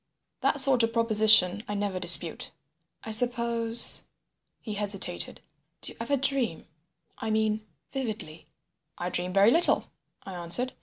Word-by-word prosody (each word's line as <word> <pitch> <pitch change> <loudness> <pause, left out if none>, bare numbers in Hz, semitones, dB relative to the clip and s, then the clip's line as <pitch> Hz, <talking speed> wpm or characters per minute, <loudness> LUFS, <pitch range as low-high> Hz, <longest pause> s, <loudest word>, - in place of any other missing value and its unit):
That 285 - 0
sort 270 -2 +6
of 230 0 -2
proposition 215 -4 +4
I 205 - -6
never 200 -2 -5
dispute. 175 -1 +3 0.5
"I 220 - -9
suppose—" 235 0 +1 0.6
he 215 - -9
hesitated. 200 -3 -4 0.4
"Do - - -7
you - - -18
ever 280 +5 -3
dream? 260 - 0 0.5
I 225 - -6
mean 215 0 -3 0.2
vividly." 215 - -8 0.5
"I 175 - -6
dream 180 +1 -4
very 200 +4 +2
little," 335 +6 0 0.3
I 195 - -11
answered. 180 +9 +1
220 Hz, 135 wpm, -24 LUFS, 195-235 Hz, 0.6 s, sort